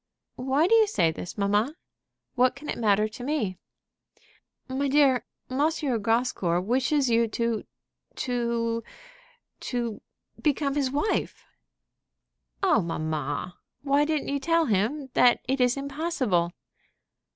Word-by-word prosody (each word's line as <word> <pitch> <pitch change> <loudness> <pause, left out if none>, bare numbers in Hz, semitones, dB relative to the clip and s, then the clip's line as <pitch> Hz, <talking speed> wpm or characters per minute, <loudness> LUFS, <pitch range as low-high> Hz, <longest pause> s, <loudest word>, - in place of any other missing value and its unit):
"Why 265 +5 +2
do 375 - +3
you 445 -1 +6
say 170 - +2
this, 170 +4 -8
mamma? 205 +8 +1 0.6
What 255 0 +3
can 290 +2 -10
it - - -2
matter 210 -1 +3
to 215 +3 -10
me?" 235 - -2 1.1
"My 270 +2 -1
dear, 270 -4 +3 0.2
M. 280 +4 +2 0.3
Grascour 225 -6 +1
wishes 260 +6 +1
you 230 0 +3
to 230 0 -2 0.5
to 235 -2 -1 0.8
to 235 -4 -3 0.4
become 290 -2 +1
his 280 -2 0
wife." 290 +10 -1 1.2
"Oh, 355 - +4
mamma, 155 0 -3 0.2
why 285 +1 +3
didn't 310 -1 -1
you 280 0 0
tell 330 +3 +2
him 245 +6 0
that 245 -1 +5
it 265 0 0
is 245 +1 +3
impossible?" 275 - -1
250 Hz, 120 wpm, -26 LUFS, 215-280 Hz, 1.2 s, you